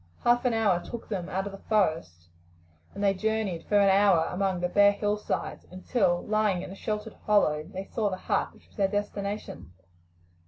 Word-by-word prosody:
Half 240 Hz, +1 st, +3 dB
an 245 Hz, -, +2 dB
hour 205 Hz, -6 st, +2 dB
took 235 Hz, -, -8 dB
them 185 Hz, -5 st, -3 dB
out 190 Hz, +1 st, -2 dB
of 200 Hz, -, -5 dB
the 195 Hz, -, -10 dB
forest, 160 Hz, -, -1 dB, 0.7 s
and 200 Hz, -, -4 dB
they 200 Hz, -1 st, +4 dB
journeyed 210 Hz, -4 st, -2 dB
for 205 Hz, -, +3 dB
an 200 Hz, -1 st, +5 dB
hour 190 Hz, -4 st, +4 dB
along 190 Hz, 0 st, -1 dB
the 180 Hz, -, +1 dB
bare 205 Hz, +2 st, +5 dB
hillsides, 210 Hz, +1 st, -3 dB
until, 185 Hz, -1 st, 0 dB
lying 210 Hz, -4 st, +1 dB
in -, -, -8 dB
a -, -, -8 dB
sheltered 210 Hz, +1 st, -4 dB
hollow, 155 Hz, -8 st, +3 dB
they 190 Hz, 0 st, -5 dB
saw 215 Hz, 0 st, -1 dB
the 185 Hz, -, -4 dB
hut -, -, -1 dB
which -, -, -22 dB
was -, -, -26 dB
their 195 Hz, -2 st, +3 dB
destination. 205 Hz, -, -4 dB
200 Hz, 190 wpm, -27 LUFS, 185-210 Hz, 0.7 s, an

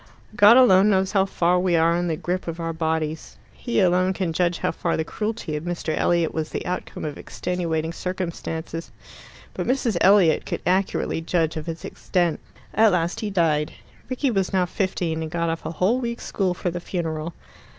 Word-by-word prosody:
God 210 Hz, +4 st, +8 dB
alone 205 Hz, -5 st, +6 dB
knows 190 Hz, -1 st, +2 dB
how 195 Hz, -2 st, +2 dB
far 180 Hz, -1 st, +2 dB
we 180 Hz, -1 st, +2 dB
are 165 Hz, +1 st, +3 dB
in 175 Hz, 0 st, 0 dB
the 165 Hz, -, 0 dB
grip 180 Hz, +3 st, -3 dB
of 165 Hz, 0 st, -4 dB
our 165 Hz, 0 st, -2 dB
bodies. 160 Hz, -1 st, -2 dB, 0.2 s
He 240 Hz, -, -2 dB
alone 185 Hz, 0 st, +3 dB
can 185 Hz, -3 st, -2 dB
judge 175 Hz, 0 st, +1 dB
how -, -, -1 dB
far 170 Hz, +1 st, -1 dB
the 160 Hz, -, 0 dB
cruelty 210 Hz, -2 st, -4 dB
of 150 Hz, -, -4 dB
Mr. 170 Hz, -2 st, -2 dB
Elliot 170 Hz, -2 st, +1 dB
was 160 Hz, -1 st, -2 dB
the -, -, -4 dB
outcome 180 Hz, -2 st, -4 dB
of 150 Hz, -2 st, -5 dB
extenuating 165 Hz, -2 st, -3 dB
circumstances. 170 Hz, -2 st, -5 dB, 0.6 s
But -, -, -4 dB
Mrs. 245 Hz, -6 st, +1 dB
Elliot 190 Hz, -5 st, +5 dB
could -, -, -4 dB
accurately 185 Hz, -2 st, 0 dB
judge 165 Hz, -1 st, 0 dB
of 155 Hz, +1 st, -5 dB
its 165 Hz, -1 st, -6 dB
extent. 175 Hz, -4 st, -1 dB, 0.3 s
At 220 Hz, 0 st, +5 dB
last 170 Hz, 0 st, 0 dB
he 215 Hz, -, -2 dB
died. 160 Hz, -6 st, +1 dB, 0.4 s
Rickie 255 Hz, +1 st, 0 dB
was 195 Hz, -4 st, 0 dB
now 185 Hz, -1 st, +2 dB
fifteen, 175 Hz, -3 st, -2 dB
and 160 Hz, -, -4 dB
got 170 Hz, 0 st, -1 dB
off 165 Hz, -, -5 dB
a -, -, -3 dB
whole 200 Hz, +9 st, +2 dB
week's 235 Hz, -1 st, -4 dB
school 185 Hz, -3 st, -1 dB
for 175 Hz, -, -2 dB
the 175 Hz, -, -4 dB
funeral. 165 Hz, -2 st, -4 dB
175 Hz, 190 wpm, -23 LUFS, 165-190 Hz, 0.6 s, God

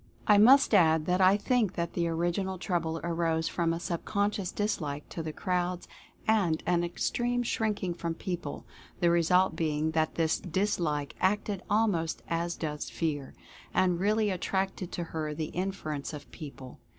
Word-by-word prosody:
I 210 Hz, -1 st, +6 dB
must 260 Hz, +4 st, +7 dB
add 160 Hz, -5 st, +5 dB
that 180 Hz, +2 st, +1 dB
I 190 Hz, +2 st, +6 dB
think 220 Hz, -2 st, +1 dB
that 170 Hz, -1 st, -3 dB
the 170 Hz, -1 st, 0 dB
original 175 Hz, +3 st, -1 dB
trouble 165 Hz, -3 st, -1 dB
arose 165 Hz, -1 st, 0 dB
from 170 Hz, -2 st, 0 dB
a 165 Hz, -, -2 dB
subconscious 200 Hz, +2 st, -1 dB
dislike 150 Hz, -9 st, -2 dB
to 165 Hz, -, -5 dB
the 160 Hz, -1 st, -4 dB
crowds 180 Hz, +1 st, -2 dB, 0.4 s
and 190 Hz, -8 st, +2 dB
an 175 Hz, -1 st, +2 dB
extreme 240 Hz, +8 st, -1 dB
shrinking 210 Hz, -6 st, -1 dB
from 170 Hz, -1 st, -3 dB
people, 175 Hz, -4 st, -5 dB, 0.3 s
the 170 Hz, -1 st, +4 dB
result 180 Hz, +2 st, +3 dB
being 155 Hz, -1 st, 0 dB
that 160 Hz, -1 st, 0 dB
this 160 Hz, -1 st, +1 dB
dis 190 Hz, +4 st, -1 dB
like 150 Hz, -4 st, -2 dB
acted 200 Hz, 0 st, +1 dB
almost 205 Hz, -7 st, +1 dB
as 170 Hz, +1 st, -1 dB
does 150 Hz, -2 st, -4 dB
Fear, 145 Hz, -5 st, -3 dB, 0.4 s
and 180 Hz, -2 st, +3 dB
really 210 Hz, +2 st, +2 dB
attracted 190 Hz, 0 st, -2 dB
to 175 Hz, -, -2 dB
her 155 Hz, -2 st, -4 dB
the 155 Hz, 0 st, -3 dB
interference 170 Hz, -6 st, -3 dB
of 150 Hz, -, -9 dB
people. 140 Hz, -5 st, -10 dB
175 Hz, 160 wpm, -29 LUFS, 160-195 Hz, 0.4 s, must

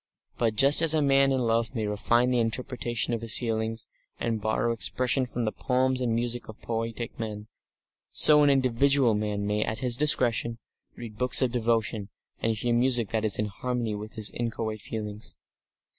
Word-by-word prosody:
But 115 Hz, -2 st, 0 dB
just 140 Hz, +7 st, +5 dB
as 160 Hz, -1 st, +4 dB
a 155 Hz, -, +2 dB
man 135 Hz, 0 st, +3 dB
in 130 Hz, -1 st, 0 dB
love 115 Hz, +1 st, 0 dB
may 110 Hz, -2 st, -2 dB
refine 120 Hz, +4 st, +1 dB
the 125 Hz, -, +1 dB
interpretation 120 Hz, -1 st, -2 dB
of 115 Hz, -, -3 dB
his 115 Hz, -1 st, +1 dB
feelings 110 Hz, -2 st, -3 dB, 0.3 s
and 115 Hz, -2 st, -2 dB
borrow 110 Hz, +2 st, 0 dB
expression 125 Hz, +3 st, +1 dB
from 120 Hz, 0 st, -4 dB
the 110 Hz, -, -1 dB
poems 130 Hz, +2 st, 0 dB
and 120 Hz, -3 st, 0 dB
music 120 Hz, 0 st, -2 dB
of 110 Hz, -, -11 dB
poietic 115 Hz, 0 st, -5 dB
men, 105 Hz, -2 st, -6 dB, 0.6 s
so 150 Hz, -1 st, +6 dB
an 145 Hz, -, +4 dB
individual 135 Hz, -1 st, +2 dB
man 105 Hz, -1 st, -2 dB
may 105 Hz, +1 st, 0 dB
at 110 Hz, -, -4 dB
his 125 Hz, -2 st, +1 dB
discretion 120 Hz, -5 st, +3 dB, 0.4 s
read 110 Hz, -3 st, -10 dB
books 125 Hz, +1 st, +4 dB
of 125 Hz, -, 0 dB
devotion 115 Hz, -3 st, -1 dB, 0.3 s
and 115 Hz, -, 0 dB
hear 120 Hz, +3 st, -1 dB
music 120 Hz, -3 st, +2 dB
that 110 Hz, -1 st, -2 dB
is 110 Hz, -2 st, +3 dB
in 105 Hz, -, -1 dB
harmony 115 Hz, +2 st, -3 dB
with 105 Hz, +1 st, -7 dB
his 110 Hz, -2 st, +1 dB
inchoate 115 Hz, -2 st, -4 dB
feelings. 105 Hz, -1 st, -6 dB
115 Hz, 180 wpm, -26 LUFS, 110-125 Hz, 0.6 s, so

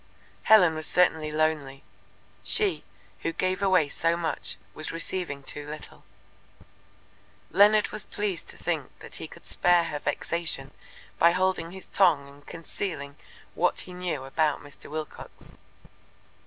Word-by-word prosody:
Helen 185 Hz, -7 st, +7 dB
was 155 Hz, 0 st, -5 dB
certainly 160 Hz, -4 st, +2 dB
lonely. 150 Hz, -3 st, 0 dB, 0.6 s
She, 420 Hz, -3 st, +2 dB, 0.4 s
who 165 Hz, -, -1 dB
gave 185 Hz, +3 st, -1 dB
away 185 Hz, -6 st, +4 dB
so 165 Hz, +4 st, 0 dB
much, 160 Hz, -, -3 dB, 0.2 s
was 155 Hz, -, -4 dB
receiving 165 Hz, -4 st, -3 dB
too 145 Hz, +2 st, -5 dB
little. 155 Hz, 0 st, -9 dB, 1.5 s
Leonard 210 Hz, +2 st, +6 dB
was 215 Hz, -, -5 dB
pleased 205 Hz, -5 st, -3 dB
to -, -, -6 dB
think -, -, -2 dB
that -, -, -9 dB
he -, -, -6 dB
could -, -, -15 dB
spare 175 Hz, -1 st, +4 dB
her 150 Hz, -3 st, -3 dB
vexation 155 Hz, -4 st, -2 dB, 0.5 s
by 170 Hz, -, +7 dB
holding 185 Hz, -2 st, +1 dB
his 190 Hz, +2 st, -10 dB
tongue 165 Hz, -8 st, +3 dB
and 140 Hz, +1 st, -17 dB
concealing 165 Hz, -4 st, -5 dB, 0.4 s
what 180 Hz, -, +2 dB
he 180 Hz, -, -8 dB
knew 180 Hz, -6 st, -3 dB
about 150 Hz, +2 st, +1 dB
Mr. 145 Hz, -1 st, -13 dB
Wilcox. 155 Hz, 0 st, -6 dB
165 Hz, 135 wpm, -27 LUFS, 150-185 Hz, 1.5 s, Helen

